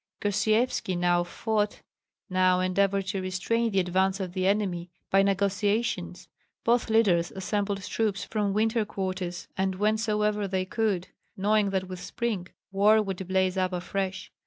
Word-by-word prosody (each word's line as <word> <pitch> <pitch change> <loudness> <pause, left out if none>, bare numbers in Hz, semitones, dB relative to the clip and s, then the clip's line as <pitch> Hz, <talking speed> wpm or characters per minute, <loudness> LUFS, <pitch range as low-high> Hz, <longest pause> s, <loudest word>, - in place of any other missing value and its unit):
Gosyevski 215 -2 +1
now 175 0 +2
fought, 210 +3 -2 0.4
now 185 -1 +3
endeavored 195 +1 +1
to 195 -1 -2
restrain 190 +5 0
the 195 -3 +1
advance 190 +2 +1
of 185 -2 -4
the 185 0 0
enemy 190 -4 0 0.2
by 195 - +5
negotiations; 200 +3 0 0.4
both 235 0 +2
leaders 195 -7 +3
assembled 200 +1 -2
troops 210 -1 -1
from 210 -2 -1
winter 220 +2 +2
quarters 185 -3 -4
and 190 0 0
whencesoever 210 0 +1
they 190 -1 -1
could, 200 -3 -1 0.3
knowing 205 +1 +2
that 190 -1 -1
with 185 -1 -7
spring 215 -4 -3 0.2
war 205 +3 +5
would 195 -3 -3
blaze 190 0 +1
up 185 0 0
afresh. 185 +1 -3
195 Hz, 140 wpm, -27 LUFS, 185-210 Hz, 0.4 s, by